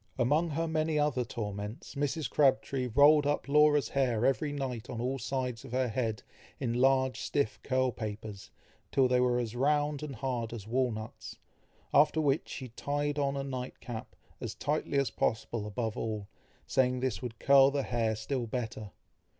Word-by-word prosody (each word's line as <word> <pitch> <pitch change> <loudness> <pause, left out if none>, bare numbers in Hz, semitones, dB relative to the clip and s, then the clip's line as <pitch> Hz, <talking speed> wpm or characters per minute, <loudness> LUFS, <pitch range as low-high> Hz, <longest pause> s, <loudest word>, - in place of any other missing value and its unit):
Among 145 +7 +2
her 165 +2 -1
many 155 -1 0
other 145 -4 +1
torments, 105 -1 -6
Mrs. 145 +2 -1
Crabtree 130 -1 +2
rolled 145 +4 +6
up 145 -1 0
Laura's 150 -3 +4
hair 125 -4 +1
every 145 +2 +1
night 130 -5 -4
on 115 - -4
all 130 +3 -1
sides 125 -2 -3
of - - -10
her 130 -1 +1
head, 110 -2 -2 0.4
in 120 -4 -1
large 130 +1 +3
stiff 140 -7 -1
curl 130 -1 +1
papers, 105 -3 -6 0.4
till 135 -1 +4
they 125 0 +3
were 125 -1 +3
as 120 -2 -2
round 145 +2 +1
and 150 -3 -5
hard 120 -1 -3
as 110 -4 -7
walnuts, 115 -2 -3 0.6
after 150 +2 +5
which, 145 -1 +1
she 130 -2 -6
tied 145 +4 -2
on 140 -1 0
a 135 - -2
night 130 -2 -5
cap, 115 -2 -7 0.2
as - - -5
tightly 145 0 -1
as 135 -5 +1
possible 110 -1 -1
above 110 +1 -3
all, 110 -3 -3 0.4
saying 125 -1 +2
this 125 -7 -2
would 115 -2 -6
curl 140 +1 +6
the 140 0 -1
hair 115 -3 0
still 120 +3 -3
better. 110 -3 -4
130 Hz, 170 wpm, -31 LUFS, 115-140 Hz, 0.6 s, rolled